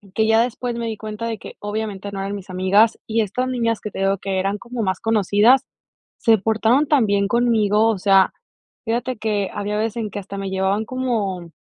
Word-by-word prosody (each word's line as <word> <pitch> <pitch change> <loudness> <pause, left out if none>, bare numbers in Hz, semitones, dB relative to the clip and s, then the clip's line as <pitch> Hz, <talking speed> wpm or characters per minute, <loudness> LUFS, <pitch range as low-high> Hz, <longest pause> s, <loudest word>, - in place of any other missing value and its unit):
que 220 - +2
ya 225 0 +4
después 245 0 -2
me 235 0 -3
di 225 - -3
cuenta 215 +1 -6
de 230 -1 -3
que - - -11
obviamente 205 -1 -4
no 195 - -4
eran 195 +1 -3
mis 200 -2 -8
amigas 190 +5 +3
y 225 +1 -1
estas 225 +5 -1
niñas 230 -3 -1
que 210 - -6
te - - -7
digo 195 0 +1
que 190 0 -2
eran 195 +2 -1
como 240 +2 -6
más 190 -4 -1
conocidas, 220 +3 +3 0.5
se 225 -2 +4
portaron 225 +7 +2
tan 275 -6 +3
bien 200 -1 +1
conmigo, 220 -2 +2
o 220 - 0
sea, 195 0 +4 0.5
fíjate 240 +2 -2
que 210 -3 -1
había 205 +1 -3
veces 220 +1 -2
en 220 -2 -2
que - - -4
hasta 200 0 -8
me 195 0 -4
llevaban 190 +3 0
como, 210 -9 -2
215 Hz, 210 wpm, -21 LUFS, 200-230 Hz, 0.5 s, ya